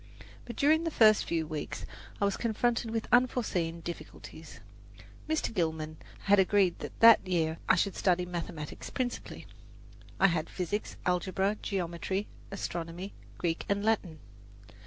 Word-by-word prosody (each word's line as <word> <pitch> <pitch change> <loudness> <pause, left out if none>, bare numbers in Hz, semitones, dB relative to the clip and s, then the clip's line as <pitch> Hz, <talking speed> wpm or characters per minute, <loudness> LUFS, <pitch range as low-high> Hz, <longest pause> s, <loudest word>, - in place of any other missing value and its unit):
But 235 - -7
during 310 +5 +3
the 330 - 0
first 215 -8 +5
few 165 -1 -1
weeks 155 -1 -5 0.3
I 200 - +2
was 200 - +1
confronted 235 0 0
with 225 0 -2
unforeseen 210 -10 +1
difficulties. 170 +1 -9 0.7
Mr. 315 -6 0
Gilman 160 -4 -2 0.2
had 200 0 +4
agreed 190 -2 +3
that - - -8
that 230 -4 +8
year 165 -3 0
I - - +7
should 195 +2 0
study 180 -1 +2
mathematics 170 -3 -6
principally. 250 -2 -4 0.7
I 195 - +5
had 165 -4 +1
physics, 190 +3 -3
algebra, 190 +3 +1
geometry, 190 +1 -2 0.2
astronomy, 175 -1 -5 0.2
Greek 165 -2 -1
and 200 +1 0
Latin. 200 -7 0
190 Hz, 135 wpm, -30 LUFS, 170-215 Hz, 0.7 s, that